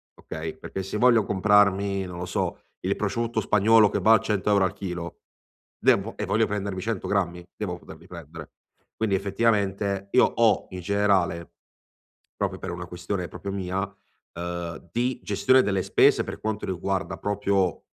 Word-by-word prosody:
Okay? -, -, -7 dB
Perché 95 Hz, -, -6 dB
se 95 Hz, +3 st, -4 dB
voglio 120 Hz, -2 st, +5 dB
comprarmi, 100 Hz, -1 st, +3 dB
non 90 Hz, -1 st, -7 dB
lo 90 Hz, -, -3 dB
so, -, -, -2 dB, 0.2 s
il -, -, 0 dB
prosciutto 115 Hz, -1 st, -1 dB
spagnolo 105 Hz, +1 st, +5 dB
che -, -, -1 dB
va 110 Hz, -, +5 dB
a 110 Hz, -, +6 dB
100 105 Hz, 0 st, -1 dB
euro 100 Hz, -2 st, +4 dB
al 95 Hz, -, -2 dB
chilo 90 Hz, -4 st, -6 dB, 0.6 s
vengo -, -, +3 dB
e -, -, -2 dB
voglio 110 Hz, +2 st, +2 dB
prendermi 100 Hz, -2 st, -3 dB
100 110 Hz, 0 st, -3 dB
grammi, 90 Hz, -3 st, -1 dB
devo 90 Hz, -5 st, -3 dB
poterli -, -, -14 dB
prendere. 80 Hz, -2 st, -10 dB, 0.4 s
Quindi 110 Hz, -3 st, 0 dB
effettivamente, 100 Hz, -1 st, 0 dB
io 125 Hz, -, +6 dB
ho 115 Hz, -2 st, +2 dB
in 90 Hz, -1 st, -6 dB
generale 95 Hz, -3 st, +1 dB, 0.9 s
proprio -, -, -2 dB
per -, -, -5 dB
una 90 Hz, 0 st, -6 dB
questione 90 Hz, +1 st, -4 dB
proprio 100 Hz, +5 st, -6 dB
mia, 95 Hz, -1 st, -2 dB, 0.5 s
uhm, 85 Hz, -1 st, -6 dB
di 125 Hz, +1 st, -1 dB
gestione 130 Hz, 0 st, +4 dB
delle 95 Hz, -2 st, 0 dB
spese, -, -, +4 dB
per -, -, -7 dB
quanto 110 Hz, -1 st, -3 dB
riguarda 95 Hz, +1 st, -2 dB
proprio 100 Hz, -4 st, 0 dB
100 Hz, 160 wpm, -25 LUFS, 90-105 Hz, 0.9 s, a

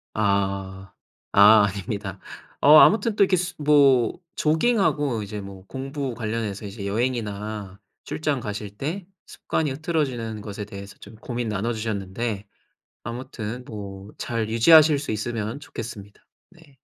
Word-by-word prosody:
아. 95 Hz, -2 st, -1 dB, 0.4 s
아 105 Hz, +1 st, +8 dB
아닙니다. 100 Hz, -1 st, -5 dB, 0.4 s
어 150 Hz, +2 st, +8 dB
아무튼 220 Hz, +5 st, +5 dB
또 205 Hz, -, +3 dB
이렇게 185 Hz, -1 st, +2 dB
수 180 Hz, +1 st, -2 dB
뭐 140 Hz, -4 st, +4 dB, 0.2 s
조깅하고 155 Hz, -, +1 dB
이제 105 Hz, +1 st, -6 dB
뭐 95 Hz, -1 st, -10 dB
공부 135 Hz, 0 st, -4 dB
관련해서 110 Hz, -3 st, -3 dB
이제 100 Hz, 0 st, -7 dB
여행이나 105 Hz, -3 st, -3 dB, 0.3 s
출장 150 Hz, -4 st, -2 dB
가실 105 Hz, -2 st, -5 dB
때 170 Hz, +6 st, -4 dB, 0.2 s
습관이 155 Hz, -3 st, -2 dB
흐트러지는 130 Hz, -8 st, -2 dB
것에 105 Hz, 0 st, -6 dB
대해서 100 Hz, -1 st, -10 dB
좀 105 Hz, +2 st, -13 dB
고민 120 Hz, 0 st, -4 dB
나눠주셨는데 105 Hz, -1 st, -3 dB, 0.6 s
아무튼 120 Hz, 0 st, -6 dB
뭐 100 Hz, -1 st, -8 dB
잘 115 Hz, -2 st, -2 dB
유지하실 150 Hz, +6 st, +6 dB
수 145 Hz, -, -5 dB
있으면 110 Hz, +3 st, -3 dB
좋겠습니다. 105 Hz, -6 st, -9 dB, 0.3 s
네. 160 Hz, -6 st, -21 dB
115 Hz, 285 characters per minute, -24 LUFS, 100-140 Hz, 0.6 s, 아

